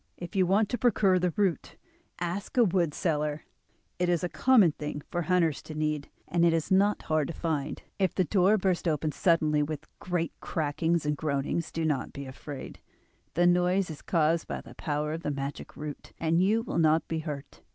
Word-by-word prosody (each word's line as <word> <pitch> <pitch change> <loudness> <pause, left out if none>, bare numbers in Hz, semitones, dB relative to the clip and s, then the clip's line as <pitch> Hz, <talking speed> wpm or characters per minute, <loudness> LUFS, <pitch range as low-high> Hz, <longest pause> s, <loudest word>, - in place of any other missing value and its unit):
If 175 +4 -8
you 185 -2 +3
want 200 +3 +3
to 245 - -2
procure 200 -6 +3
the 180 0 +1
root 190 -7 0 0.4
ask 180 +7 -4
a 245 - +7
wood 175 -6 +1
seller; 150 -2 -1 0.5
it 180 0 +1
is 175 0 +1
a 180 - 0
common 190 - +5
thing 150 -1 -6
for 175 - 0
hunters 170 -4 +1
to 155 - -9
need, 150 -1 -1 0.2
and 170 +2 +1
it 170 -1 +5
is 165 +1 -1
not 200 +2 +3
hard 155 -2 +1
to 170 - -6
find. 155 -5 -2 0.2
If 190 -2 +1
the 185 - +3
door 195 +3 +3
bursts 185 -2 0
open 155 -1 0
suddenly 155 -3 +2
with 150 0 -4
great 175 -2 -2
crackings 160 +1 0
and 150 0 +1
groanings 145 +2 -2
do 165 -1 -2
not 150 -4 -1
be 140 - -6
afraid, 135 +1 -8 0.6
the 175 - +4
noise 180 +1 +3
is 150 - -9
caused 165 -1 +1
by - - -4
the - - -13
power 150 0 -2
of 165 - -4
the 150 - -2
magic 140 0 -5
root, 150 -1 -7
and 165 +1 +2
you 215 +4 +3
will 225 - -2
not 160 0 +3
be 160 - -2
hurt. 150 -3 -7
165 Hz, 200 wpm, -28 LUFS, 150-180 Hz, 0.6 s, a